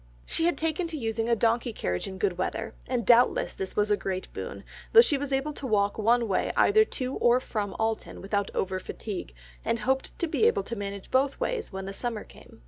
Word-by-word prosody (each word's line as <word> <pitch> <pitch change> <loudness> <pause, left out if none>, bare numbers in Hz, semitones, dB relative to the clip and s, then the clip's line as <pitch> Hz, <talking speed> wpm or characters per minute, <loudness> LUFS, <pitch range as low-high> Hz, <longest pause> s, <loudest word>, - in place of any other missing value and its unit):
She 330 - 0
had 345 - +2
taken 325 +2 -1
to 325 -1 -5
using 225 -2 -1
a 235 - +4
donkey 230 +2 +1
carriage 90 - -2
in 190 -1 -7
good 190 -3 0
weather, 225 +4 -2
and 245 -3 -1
doubtless 240 +2 +4
this 190 - -5
was 210 0 +2
a - - +6
great 190 -2 -4
boon, - - -6 0.3
though 460 - +11
she 390 -11 +2
was 280 0 -3
able 270 +3 0
to 275 - -6
walk 205 -2 +1
one 235 +2 +3
way 195 - 0
either 435 +1 +6
to 255 -9 -4
or 240 +1 +4
from 210 -6 -3
Alton 220 0 -2
without 200 0 -1
over 190 0 -1
fatigue, 195 - -6 0.3
and - - 0
hoped 265 +1 -1
to 340 - 0
be 435 +7 +3
able 440 -4 +2
to 235 - -5
manage 200 -2 -6
both 270 +1 +2
ways - - -2
when 190 -1 -5
the 195 - -5
summer 230 0 -3
came. - - -17
230 Hz, 220 wpm, -28 LUFS, 200-275 Hz, 0.3 s, though